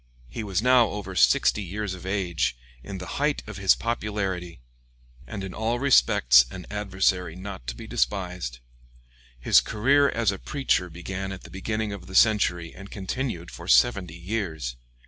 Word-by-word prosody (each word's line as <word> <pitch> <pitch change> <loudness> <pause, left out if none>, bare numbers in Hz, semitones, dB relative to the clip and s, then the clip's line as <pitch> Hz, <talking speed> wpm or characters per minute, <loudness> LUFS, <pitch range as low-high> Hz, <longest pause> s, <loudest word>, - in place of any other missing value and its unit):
He 115 - -5
was 100 0 -1
now 125 -2 +5
over 95 -2 -6
sixty 105 - +4
years 100 +1 -4
of 95 0 -9
age, 90 -9 -1 0.3
in 100 +3 -6
the 90 - -7 0.2
height 150 0 +1
of 105 -2 -8
his 95 -1 +4
popularity, 100 -7 -3 0.7
and 100 -3 -6
in 95 - -6
all 115 +2 -1
respects 65 - +5
an 90 +7 -9
adversary 95 -4 0
not 95 -9 -8
to - - -3
be - - -9
despised. 90 -10 -2 0.8
His - - +5
career 140 +6 +3
as 115 -5 +1
a 100 - -6
preacher 135 -11 0
began 95 +3 -5
at 90 - -8
the - - -12
beginning 110 +2 -3
of 100 -3 -9
the 95 - -9
century 90 -6 +3
and 100 +2 -11
continued 100 -3 -4
for - - -10
seventy 80 +8 +3
years. 85 - -4
95 Hz, 165 wpm, -25 LUFS, 90-105 Hz, 0.8 s, now